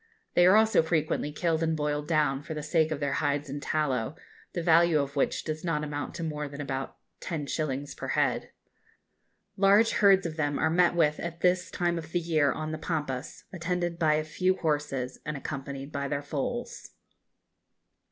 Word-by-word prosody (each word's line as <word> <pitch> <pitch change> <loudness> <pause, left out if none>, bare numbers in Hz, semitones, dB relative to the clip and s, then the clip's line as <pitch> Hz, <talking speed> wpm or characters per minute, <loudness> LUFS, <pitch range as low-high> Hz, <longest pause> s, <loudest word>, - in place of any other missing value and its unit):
They 175 0 +6
are 190 - +7
also 220 -3 +5
frequently 160 -2 0
killed 160 +1 0
and 160 -1 +1
boiled 150 0 -1
down, 150 -4 +2
for 160 +1 -6
the 150 - -4
sake 160 +1 +2
of 155 -2 -3
their 140 -2 -1
hides 145 -1 -1
and 145 +1 -5
tallow, 135 -4 -1 0.4
the 175 - -2
value 165 -1 +5
of 140 0 -3
which 140 - 0
does 155 0 -4
not 160 -4 -1
amount 145 -1 -4
to 170 - -4
more 150 -2 -3
than 140 0 -9
about 135 -2 -4 0.2
10_s_. 145 -3 -3
per - - -5
head. - - 0 1.1
Large 200 +3 +5
herds 195 -2 +5
of 160 -1 -4
them 145 -2 0
are 160 - +1
met 175 +1 +3
with 150 -3 +2
at 170 0 -5
this 180 0 +2
time 175 -1 0
of 160 0 -10
the 175 - +2
year 155 -4 +2
on 155 +2 -4
the 155 - -4
Pampas, 150 -6 -4
attended 175 -1 -2
by 155 -2 +4
a 155 - 0
few 185 +4 +1
horses, 145 -6 -2
and 150 -1 -4
accompanied 140 0 -6
by 140 -1 -2
their 140 0 -2
foals. 150 - -4
155 Hz, 185 wpm, -28 LUFS, 145-170 Hz, 1.1 s, are